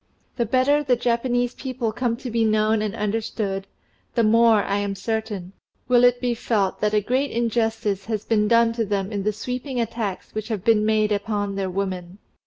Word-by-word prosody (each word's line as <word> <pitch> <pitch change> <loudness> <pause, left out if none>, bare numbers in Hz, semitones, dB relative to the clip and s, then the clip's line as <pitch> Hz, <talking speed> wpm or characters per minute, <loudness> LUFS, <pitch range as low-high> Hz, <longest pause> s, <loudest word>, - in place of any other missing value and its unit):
The 235 -3 0
better 260 +5 +3
the 260 -3 +3
Japanese 245 +1 0
people 255 -4 -3
come 230 +1 -1
to 250 0 -6
be 230 0 +1
known 215 0 +2
and 215 0 -2
understood, 210 -2 -2 0.5
the 235 - +3
more, 225 -1 +5
I 200 - -1
am 200 -1 -2
certain, 210 -2 -4 0.3
will 245 -1 +4
it 245 0 +5
be 245 -1 0
felt 215 -5 -1
that 210 0 +1
a 210 - +3
great 260 +6 0
injustice 225 -4 -1
has 215 -2 -3
been 210 -2 +2
done 230 +1 +4
them 205 -3 -2
in 205 -2 -2
the 210 +2 +1
sweeping 250 +4 -4
attacks 225 -4 -3
which 215 0 -4
have 215 -5 -3
been 220 -2 +3
made 215 -1 +2
upon 205 -1 -1
their 195 -1 -2
women. 185 -1 -4
220 Hz, 190 wpm, -23 LUFS, 205-235 Hz, 0.5 s, more